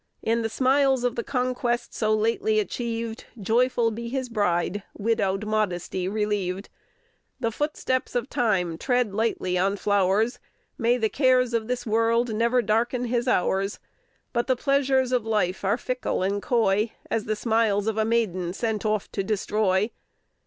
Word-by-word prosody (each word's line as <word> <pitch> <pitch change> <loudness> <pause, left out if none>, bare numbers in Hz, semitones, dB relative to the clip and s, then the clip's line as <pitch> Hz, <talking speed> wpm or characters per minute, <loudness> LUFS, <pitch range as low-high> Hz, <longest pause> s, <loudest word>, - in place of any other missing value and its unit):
In 230 +1 +1
the 225 - -1
smiles 265 +1 +2
of 245 -1 +1
the 235 - -3
conquest 250 -2 -1
so 215 -1 0
lately 230 - +2
achieved, 230 - -3
Joyful 230 +3 +2
be 235 +2 -5
his 260 0 -3
bride, 205 -3 0 0.2
"widowed 200 -2 0
modesty" 190 -4 -1
relieved. 200 -2 -2 0.7
The 230 -3 0
footsteps 260 -2 -2
of 245 0 0
time 180 -11 0
tread 245 -5 +1
lightly 200 -4 0
on 195 +2 +2
flowers, 205 +5 +1 0.4
May 240 +1 +2
the 225 -3 +1
cares 255 -1 +2
of 225 -1 0
this 245 0 -2
world 230 +1 +2
ne'er 235 +3 +2
darken 240 +4 +1
his 240 +1 -1
hours! 195 -3 +1 0.6
But 240 0 0
the 260 - +3
pleasures 265 -1 +2
of 250 -3 +2
life 210 -5 0
are 200 +4 +2
fickle 250 -6 -2
and 200 +2 0
coy 220 -2 +1 0.2
As 225 -2 0
the 215 - -1
smiles 220 -2 +1
of 220 0 -1
a - - +3
maiden 195 -6 0
sent 220 0 -2
off 215 -2 -1
to 195 - -2
destroy. 210 0 +1
225 Hz, 155 wpm, -25 LUFS, 205-245 Hz, 0.7 s, the